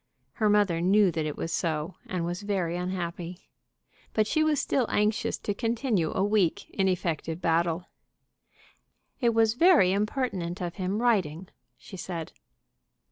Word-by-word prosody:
Her 215 -2 +1
mother 205 -5 +3
knew 195 +1 +4
that 155 -1 -2
it 150 - -5
was 165 - -3
so, 160 0 -1
and 180 -2 -2
was 175 +2 -3
very 190 -5 -1
unhappy. 175 -1 -5 0.6
But 215 - +2
she 310 +8 +1
was 310 -3 +2
still 260 -3 +1
anxious 210 +1 +1
to 205 - -3
continue 225 - 0
a 190 - +2
weak, 205 -5 +1
ineffective 175 -4 -1
battle. 170 0 +1 1.3
"It 235 -3 +2
was 225 -1 +4
very 315 - +5
impertinent 200 -4 -1
of 175 -2 -4
him 195 +4 -1
writing," 185 -7 +1 0.3
she 190 - -11
said. 170 -3 -5
185 Hz, 140 wpm, -27 LUFS, 170-215 Hz, 1.3 s, very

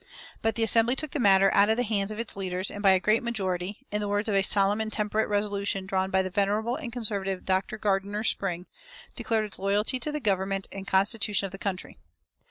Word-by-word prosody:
But 225 -1 0
the 230 - 0
Assembly 230 +3 +4
took 305 0 -2
the 295 - -3
matter 195 -3 +5
out 200 +1 +4
of 220 - +2
the 245 - +1
hands 205 -3 -1
of 215 - -6
its 230 -1 -2
leaders, 185 -1 -2
and 205 - -7
by 200 - +5
a 190 - +3
great 215 +4 +2
majority, 200 -1 -4
in 210 0 -1
the 205 - -2
words 205 +2 -1
of 215 - -1
a 195 - +3
solemn 200 +2 +3
and 220 0 -4
temperate 215 0 -1
resolution 200 -1 0
drawn 190 0 -1
by 190 0 +2
the 185 - -5
venerable 210 +4 0
and 270 -5 -6
conservative 200 -5 -3
Dr. 190 +3 -1
Gardiner 205 0 -1
Spring, 180 -5 0 0.5
declared 220 -2 -1
its 205 - -6
loyalty 205 +6 +1
to 300 - -3
the 300 - -3
government 195 -4 -1
and 195 -1 -8
constitution 200 0 +2
of 195 - -6
the 195 - -9
country. 190 -2 -5
205 Hz, 225 wpm, -27 LUFS, 195-220 Hz, 0.5 s, matter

